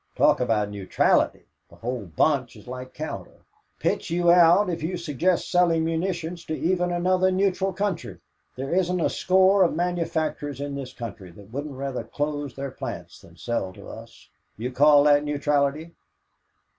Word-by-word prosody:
Talk - - +4
about 110 -4 0
neutrality! 100 -2 +1 0.2
The - - -16
whole 120 -2 -4
bunch 125 - +1
is - - -14
like 130 +1 -7
Cowder. 155 0 -7 0.4
Pitch - - -1
you 175 +1 +3
out 175 +3 +6
if 170 -2 -3
you 175 +4 -2
suggest 170 +2 0
selling 170 -3 +3
munitions 170 0 -2
to 155 - -3
even 180 0 0
another 185 +1 +2
neutral 190 0 +1
country. 185 - -3 0.4
There 135 +4 -4
isn't 180 0 +1
a - - +1
score 190 +1 +4
of 170 -4 +3
manufacturers 165 -5 -2
in 140 0 -4
this 135 -2 -6
country 110 -5 -8
that 100 +3 -15
wouldn't 140 +1 -5
rather 135 -1 -3
close 145 -2 -4
their 140 0 -5
plants - - -7
than - - -18
sell 120 -6 -2
to - - -12
us. - - -12 0.3
Do 110 - -8
you 125 - -2
call 145 +2 +6
that 145 0 +5
neutrality?" 145 +2 0
155 Hz, 165 wpm, -25 LUFS, 135-175 Hz, 0.4 s, out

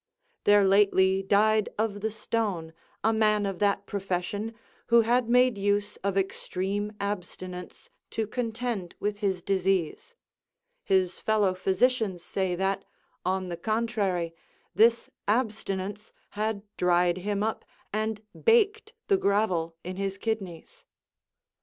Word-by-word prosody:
There 205 0 +6
lately 195 -1 +4
died 210 +2 +3
of 210 -2 -1
the 220 - 0
stone 205 -7 -2 0.3
a 225 +2 +3
man 215 -1 +3
of 195 -2 -3
that 200 -1 +1
profession, 200 +3 -3 0.3
who 235 0 +6
had 235 +1 +2
made 250 -3 +4
use 205 +1 0
of 195 0 -2
extreme 195 +2 -2
abstinence 185 -2 -6 0.2
to 225 - -2
contend 225 -4 -3
with 205 0 -2
his 190 -4 -1
disease: 190 - 0 0.7
his 185 -2 +1
fellow 210 -3 +2
physicians 190 0 +1
say 190 -2 -1
that, 195 +2 -1 0.4
on 185 0 -1
the 170 - -4
contrary, 205 -5 -1 0.4
this 230 +5 +4 0.2
abstinence 210 -3 -2 0.2
had 215 -1 -2
dried 175 0 +3
him 205 +2 -1
up 220 0 -2 0.3
and 215 0 -2 0.2
baked 440 -1 +3
the 395 - +4
gravel 195 - +1
in 185 +1 -6
his 195 0 -2
kidneys. 220 - -5
205 Hz, 120 wpm, -28 LUFS, 190-220 Hz, 0.7 s, There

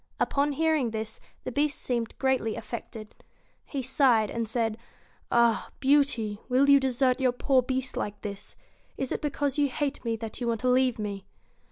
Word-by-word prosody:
Upon 285 +1 +1
hearing 310 -4 +2
this, 220 0 -5 0.2
the - - -4
Beast 290 +3 0
seemed 235 -3 -2
greatly 260 -5 +1
affected. 225 -2 -7 0.5
He 275 -3 -4
sighed, 245 -5 +3
and 230 -1 -2
said: 225 -1 -1 0.5
'Ah! 235 -1 +3
Beauty, 265 -7 +2
will 270 +3 +4
you 280 - +8
desert 260 -1 +1
your 255 -1 +4
poor 260 +1 +3
Beast 260 +1 -3
like 205 0 -3
this? 200 -1 -7 0.4
Is 265 - -2
it - - -2
because 285 -1 -1
you 285 -1 +3
hate 285 +2 -3
me 230 -1 -1
that 225 +1 -7
you 240 - -1
want 230 -2 -1
to 255 - +2
leave 255 -1 +3
me 200 -2 -5
250 Hz, 175 wpm, -28 LUFS, 225-275 Hz, 0.5 s, you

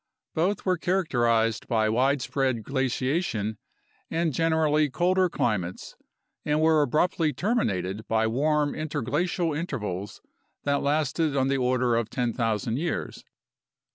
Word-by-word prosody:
Both 185 +5 0
were 185 -3 +1
characterized 120 - +1
by 110 -2 +2
widespread 130 0 +1
glaciation 130 - -1 0.5
and 165 -2 0
generally 155 -1 +2
colder 180 +6 +2
climates 95 - -2 0.5
and 150 +1 +1
were 160 -1 +4
abruptly 155 +2 +1
terminated 110 - -1
by 110 0 +2
warm 145 +5 +1
interglacial 155 +3 -1
intervals 105 - -4 0.4
that 140 0 +1
lasted 150 +1 0
on 135 0 +2
the 140 - +1
order 125 -1 +2
of 115 -1 -1
10,000 115 -1 -1
years. 170 +1 -3
140 Hz, 110 wpm, -26 LUFS, 115-160 Hz, 0.5 s, were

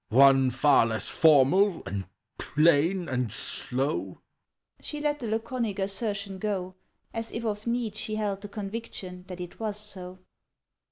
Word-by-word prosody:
"One 135 +2 +6
far 130 -1 +4
less 110 -3 -3
formal 165 +5 +5
and 100 -1 -3 0.3
plain 165 +4 +3
and 125 -5 -1
slow!" 135 +3 -2 0.6
She 300 - -5
let 295 0 0
the 240 - -4
laconic 225 -1 -2
assertion 200 0 -2
go 190 -3 -2 0.4
As 225 0 -3
if 230 0 -4
of 210 0 -3
need 235 -3 -1
She 215 0 -3
held 205 -2 -2
the 205 - -6
conviction 195 -3 -6
that 180 -1 -7
it 180 -1 -8
was 215 -2 -2
so. 185 -3 -7
195 Hz, 145 wpm, -28 LUFS, 145-215 Hz, 0.6 s, One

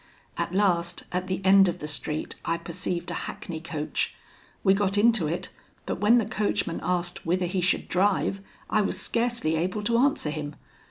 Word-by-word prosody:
At - - -2
last, 175 -4 +1
at 180 +1 -2
the 190 +1 -3
end 195 0 +7
of 175 - -1
the 150 - -6
street, 150 +1 -3
I 165 - 0
perceived 170 +1 -3
a - - -4
hackney 160 -3 -6
coach; 160 -2 -2 0.5
we 190 - +5
got 200 0 +1
into 215 -5 +4
it, 170 +4 -3 0.4
but - - -3
when 210 +4 +5
the 230 - +2
coachman 205 -5 -1
asked 175 -1 -1
whither 180 +2 +1
he 180 +1 -1
should 180 - +1
drive, 195 +1 +1 0.3
I 215 - +2
was 200 - 0
scarcely 235 -9 0
able 185 +6 -1
to 235 +2 +2
answer 265 - +2
him. 150 -1 -5
185 Hz, 180 wpm, -26 LUFS, 170-205 Hz, 0.5 s, end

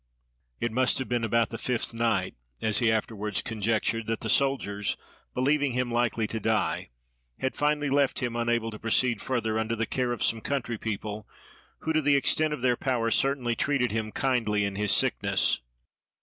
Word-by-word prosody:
It 120 - -1
must 130 +3 +3
have 130 - -3
been 120 -1 0
about 115 +1 +2
the 115 - -5
fifth 120 -2 -1
night, 115 -5 0 0.3
as 110 -2 +2
he 115 -2 +3
afterwards 105 -2 -1
conjectured, 115 0 -1
that 115 0 -2
the 110 - 0
soldiers, 125 -8 +1 0.4
believing 140 +1 +2
him 125 -1 -1
likely 120 -2 +1
to 110 +1 -3
die, 110 0 0 0.5
had 130 - -2
finally 150 -1 +1
left 140 -1 +2
him 120 -2 -2
unable 120 -1 0
to 105 - -9
proceed 115 0 +1
further, 110 -4 -1
under 110 +1 -1
the 115 0 -1
care 125 +1 -1
of 120 - -2
some 115 -1 +1
country 120 -5 -2
people, 105 -1 -4 0.5
who 160 - -1
to 155 - +3
the 145 -1 +4
extent 155 +3 +2
of 150 - -3
their 125 -1 +3
power 120 -3 0
certainly 130 -3 +1
treated 135 -1 +1
him 110 0 -2
kindly 115 -6 +1
in 100 -1 -3
his 105 0 +1
sickness. - - +2
115 Hz, 180 wpm, -27 LUFS, 110-130 Hz, 0.5 s, the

